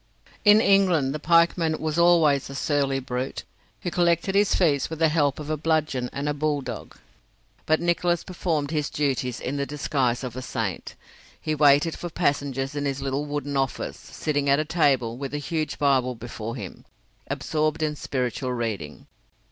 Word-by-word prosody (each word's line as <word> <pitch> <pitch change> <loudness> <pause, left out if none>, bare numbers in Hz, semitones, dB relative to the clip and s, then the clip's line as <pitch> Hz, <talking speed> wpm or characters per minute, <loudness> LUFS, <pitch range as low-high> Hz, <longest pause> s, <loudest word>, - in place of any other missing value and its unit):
In 210 +1 +7
England 180 -10 +3
the 155 - -4
pike 170 +3 +4
man 160 -2 0
was 155 +1 -1
always 160 -6 +4
a 140 - -7
surly 140 -2 0
brute, 125 0 -4 0.4
who 175 - -3
collected 175 +2 +2
his 200 0 +3
fees 145 -7 +2
with 160 - -5
the 160 0 +3
help 145 -3 +1
of 150 0 -5
a 155 - 0
bludgeon 150 -5 0
and 140 +1 -4
a 150 - +1
bulldog, 145 -3 -3 0.7
but 155 0 +3
Nicholas 175 0 +1
performed 160 -5 -2
his 150 -2 -1
duties 130 -4 -1
in 135 +3 -3
the 140 - -1
disguise 135 -4 -1
of 125 -2 -5
a 130 - -4
saint. 115 -8 -4 0.4
He 155 - -2
waited 145 +2 +4
for 175 - -6
passengers 140 -4 -1
in 145 -1 -3
his 140 -1 -1
little 135 +2 -1
wooden 145 -1 -3
office, 135 -1 -2
sitting 145 -2 -2
at 140 - +5
a 155 - 0
table, 135 -8 +1
with 140 +1 -5
a - - 0
huge 155 +1 -3
Bible 130 -3 +2
before 115 0 -6
him, 100 -8 -8 0.4
absorbed 155 0 -1
in 150 -1 0
spiritual 130 -2 -2
reading. 105 -11 -4
145 Hz, 175 wpm, -25 LUFS, 135-160 Hz, 0.7 s, In